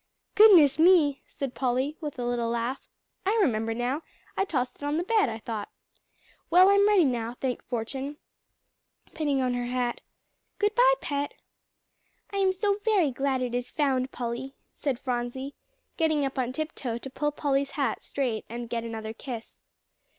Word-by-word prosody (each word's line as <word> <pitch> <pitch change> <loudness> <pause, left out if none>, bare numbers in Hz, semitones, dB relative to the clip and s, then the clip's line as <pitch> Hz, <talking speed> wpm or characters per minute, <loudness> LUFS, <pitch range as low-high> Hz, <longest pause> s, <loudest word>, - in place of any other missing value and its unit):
"Goodness 340 -10 +7
me!" 320 -5 +5
said 275 -3 -5
Polly 260 +3 0
with 295 -3 -5
a 245 - -3
little 240 -1 -1
laugh, 235 +3 -2 0.4
"I 410 +4 +1
remember 225 - +1
now, 250 +6 -1 0.3
I 390 - +1
tossed 250 -8 -2
it - - -27
on 290 +1 0
the 340 - 0
bed, 425 - +2
I 220 - -4
thought. 220 -2 -5 0.8
Well, 365 +3 +7
I'm 400 0 +5
ready 405 -6 +5
now, 240 -2 -1
thank 255 -2 -2
fortune," 265 +5 -4 1.0
pinning 285 -4 0
on 250 -1 +1
her 245 0 -2
hat. 245 -1 -1 0.6
"Good 415 0 +1
bye, - - +6
Pet." 285 0 -3 1.0
"I 400 - -3
am 385 -1 +3
so 400 +2 0
very 395 -10 +3
glad 265 0 0
it 245 -1 -3
is 245 0 -1
found, 265 -3 0
Polly," 245 +3 -5 0.2
said 275 -4 -2
Phronsie, 250 +2 -3 0.4
getting 315 -3 +2
up 270 0 -3
on 250 -1 0
tiptoe 270 -4 -4
to 270 - -8
pull 295 +2 -1
Polly's 280 -1 0
hat 270 -6 0
straight 245 -6 -2
and 235 0 -6
get 230 -1 -1
another 220 -1 -5
kiss. 235 -1 -8
270 Hz, 165 wpm, -27 LUFS, 245-310 Hz, 1.0 s, Goodness